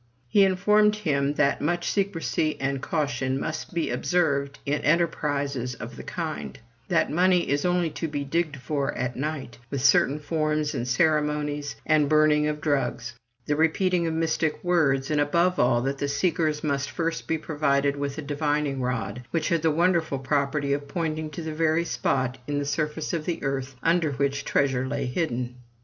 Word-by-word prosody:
He 200 +11 +5
informed 210 +3 +4
him 145 -8 0
that 140 -1 +2
much 175 +3 0
secrecy 165 -6 0
and 135 0 -1
caution 135 -4 -1
must 155 +2 -4
be 170 -2 -1
observed 140 -6 0
in 145 +1 0
enterprises 145 -6 0
of - - -8
the - - -8
kind; 70 -2 -5 0.3
that - - +2
money 180 +1 +3
is 145 +3 0
only 175 -2 +1
to 150 +3 -3
be 145 -2 -3
digged 155 +1 -1
for 140 +2 -2
at 125 -1 -2
night; 140 -3 -4
with 140 -2 -3
certain 140 +1 +4
forms 155 0 -1
and 120 - -3
ceremonies, 150 0 +1
and 155 -2 +3
burning 155 -1 +4
of 150 0 -3
drugs; 125 -5 -1 0.3
the 150 - +1
repeating 170 +2 +2
of 160 - -1
mystic 160 -1 0
words, 150 -6 +2
and, 150 -1 +2
above 170 +5 +2
all, 120 -1 +3
that 135 +1 -2
the 140 - 0
seekers 155 0 0
must 140 -2 -1
first 165 -1 -3
be 160 - +1
provided 145 -2 +1
with 140 0 -3
a 160 - -4
divining 145 -1 -1
rod, 125 -3 -2
which 165 -2 -1
had 170 -2 +1
the 160 - +3
wonderful 165 -2 +2
property 140 +1 0
of 145 0 -3
pointing 155 0 -2
to 155 +3 -7
the 160 -1 -4
very 160 +1 +1
spot 130 -5 -1
in 145 0 -1
the 145 - -1
surface 150 +2 -2
of 160 -2 -2
the 175 - -3
earth 135 -1 -2
under 165 -3 +2
which 140 +1 -1
treasure 130 -2 +1
lay - - -2
hidden. 125 -3 -2
150 Hz, 175 wpm, -26 LUFS, 140-160 Hz, 0.3 s, He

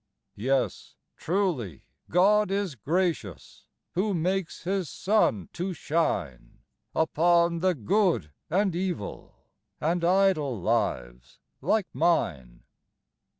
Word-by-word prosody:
Yes, 130 +5 -1 0.2
truly 160 - -2 0.3
God 205 +4 +4
is 195 -4 -1
gracious, 155 - -3 0.2
Who 195 +2 0
makes 180 +1 -2
His 185 -1 -1
sun 185 - +1
to 180 +1 -3
shine 85 - -2 0.3
Upon 170 +1 +3
the 185 +1 +2
good 160 - +1 0.2
and 190 +1 +1
evil, 175 - -4 0.4
And 170 +2 0
idle 175 - +2
lives - - -2 0.2
like 215 -3 +1
mine. 75 - 0
170 Hz, 95 wpm, -27 LUFS, 120-190 Hz, 0.4 s, God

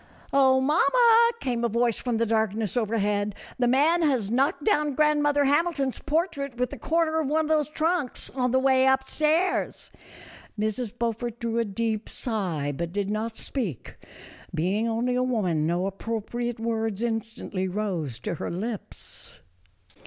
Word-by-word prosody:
"Oh, 265 -1 +5
mamma," 460 - +5
came 240 -3 -2
a 235 - +2
voice 235 0 +1
from 245 -3 -1
the 230 - +2
darkness 220 -1 0
overhead, 210 -3 0 0.2
"the 245 - +3
man 300 +7 +3
has 255 -10 +1
knocked 265 +4 +1
down 300 -10 +2
grand 300 0 +3
mother 290 -1 +3
Hamilton's 285 -2 +1
portrait 295 -5 -1
with 250 -1 -1
the - - -7
corner 320 -1 +1
of 300 -4 -1
one 315 +1 +2
of - - -5
those 305 -2 +2
trunks, 315 -3 -1
on 250 -1 0
the 260 - +2
way 260 0 +4
up 265 0 +3
stairs." 315 +7 0 0.7
Mrs. 215 +1 -1
Beaufort 235 0 -2
drew 230 0 -1
a 230 - +1
deep 220 +1 -2
sigh, 175 - -2
but 170 +3 -3
did 200 +1 -2
not 220 +1 -3
speak; 205 - -4 0.6
being 200 +8 0
only 235 +2 0
a 250 - +1
woman 190 -12 0
no 175 +2 0
appropriate 230 +4 -3
words 225 -2 -2
instantly 225 -4 -3
rose 180 - -3
to - - -3
her 165 - -4
lips. 210 +5 -6
235 Hz, 160 wpm, -26 LUFS, 215-280 Hz, 0.7 s, Oh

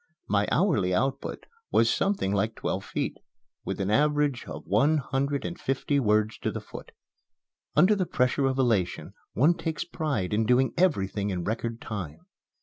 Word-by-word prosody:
My 100 0 +2
hourly 125 - +2
output 135 +7 -2 0.2
was - - +4
something 195 - 0
like 110 +2 0
twelve - - -3
feet, - - -3 0.4
with - - -4
an 100 +1 -1
average 145 0 +2
of - - -8
one 155 +3 +3
hundred 140 0 -1
and 175 - -5
fifty 135 +2 0
words 110 -2 +1
to - - -1
the - - -4
foot. - - -11 0.8
Under 180 +8 +6
the 190 -4 0
pressure 125 +2 +1
of 130 0 -1
elation 115 -9 0 0.2
one 150 +9 +4
takes 160 -1 -3
pride 145 - -2
in 110 +1 +1
doing 125 +2 +3
everything 105 - +1
in 90 -3 -2
record 115 +3 -3
time. 90 -8 -6
125 Hz, 160 wpm, -27 LUFS, 105-150 Hz, 0.8 s, Under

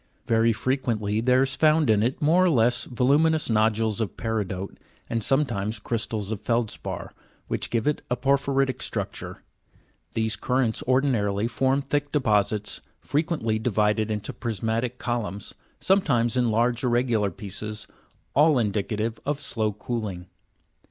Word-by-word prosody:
Very 115 0 +3
frequently 110 -3 -1
there 125 +2 +4
is 135 -1 -1
found 155 -1 +4
in 110 -2 +4
it 120 +4 0
more 165 +5 +4
or - - +4
less 120 -4 +3
voluminous 145 +4 +2
nodules 110 0 +2
of 110 - -3
peridote, 100 -4 -3 0.3
and 115 - -1
sometimes 115 -6 0
crystals 110 -2 -3
of 105 -2 -3
feldspar, 115 -1 -2 0.3
which - - -2
give 115 -2 0
it 150 - 0
a 125 - +1
por 140 +2 +3
phyritic 135 -1 0
structure. - - -5 0.7
These 110 -1 0
currents 125 -3 0
ordinarily 115 -6 +2
form 135 +3 +1
thick 145 +1 -1
deposits, 105 -6 +1 0.2
frequently 145 -8 -1
divided 110 -1 +1
into 105 -1 -3
prismatic 115 +2 -2
columns, 105 -6 -3 0.3
sometimes 125 - +2
in 125 -2 +2
large 120 +3 +1
irregular 120 -4 +2
pieces, 105 +1 -6 0.5
all 150 +1 +5
indicative 110 0 -1
of 145 0 -2
slow 110 -6 -1
cooling. 105 -4 -4
115 Hz, 135 wpm, -25 LUFS, 110-130 Hz, 0.7 s, all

